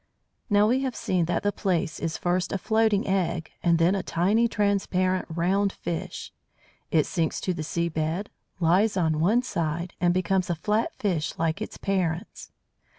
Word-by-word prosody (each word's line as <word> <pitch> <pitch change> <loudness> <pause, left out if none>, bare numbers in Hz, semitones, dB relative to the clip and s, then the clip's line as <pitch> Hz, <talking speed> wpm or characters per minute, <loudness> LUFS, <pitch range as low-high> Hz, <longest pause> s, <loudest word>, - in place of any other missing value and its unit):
Now 205 0 +4
we 250 +4 +3
have 260 -2 -2
seen 180 -3 0
that 175 - -1
the 205 - +2
Plaice 185 -4 -1
is 165 0 -2
first 180 +1 0
a - - 0
floating 220 0 +2
egg, 180 -4 -1
and 170 -1 +3
then 165 +3 +3
a 195 - 0
tiny 200 +8 +2
transparent 190 -3 0
"round" 190 +5 +1
fish. 170 -3 -5 0.6
It 155 -3 +3
sinks 165 -3 -1
to 185 - -1
the 165 - -5
sea 170 +2 -1
bed, 160 +4 -2 0.3
lies 185 +5 +3
on 160 -3 +1
one 215 +10 +3
side, 170 -5 -2
and 175 -1 +4
becomes 185 +1 +1
a 175 - +1
flat 210 +8 0
fish 170 -8 -1
like 165 +4 -1
its 215 - -5
parents. 180 -3 -2
180 Hz, 170 wpm, -26 LUFS, 165-200 Hz, 0.6 s, Now